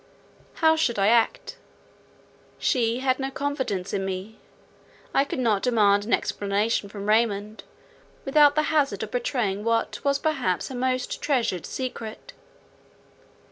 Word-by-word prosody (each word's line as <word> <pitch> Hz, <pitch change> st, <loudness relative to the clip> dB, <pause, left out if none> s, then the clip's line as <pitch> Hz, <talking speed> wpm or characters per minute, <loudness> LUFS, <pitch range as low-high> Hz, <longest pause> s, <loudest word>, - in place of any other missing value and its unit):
How 320 Hz, -1 st, +4 dB
should 275 Hz, -8 st, 0 dB
I 200 Hz, +1 st, +3 dB
act? 470 Hz, -, +1 dB, 1.0 s
She 235 Hz, -1 st, 0 dB
had 260 Hz, 0 st, +1 dB
not 270 Hz, 0 st, -4 dB
confided 260 Hz, -10 st, -2 dB
in 195 Hz, -, -1 dB
me; 190 Hz, +3 st, -5 dB, 0.7 s
I 275 Hz, -, +4 dB
could 280 Hz, -, -5 dB
not 225 Hz, -6 st, +1 dB
demand 205 Hz, -4 st, +3 dB
an 230 Hz, -, -1 dB
explanation 205 Hz, +1 st, 0 dB
from 200 Hz, 0 st, -7 dB
Raymond 215 Hz, -1 st, +1 dB, 0.6 s
without 290 Hz, +1 st, +5 dB
the 305 Hz, -, +2 dB
hazard 275 Hz, -10 st, +1 dB
of 215 Hz, -, -7 dB
betraying 235 Hz, -5 st, -1 dB
what 230 Hz, 0 st, -1 dB
was 280 Hz, 0 st, +2 dB
perhaps 270 Hz, -, -1 dB
her 260 Hz, -, -6 dB
most 255 Hz, 0 st, -2 dB
treasured 235 Hz, -, 0 dB
secret. 235 Hz, -4 st, -6 dB
235 Hz, 135 wpm, -25 LUFS, 205-270 Hz, 1.0 s, without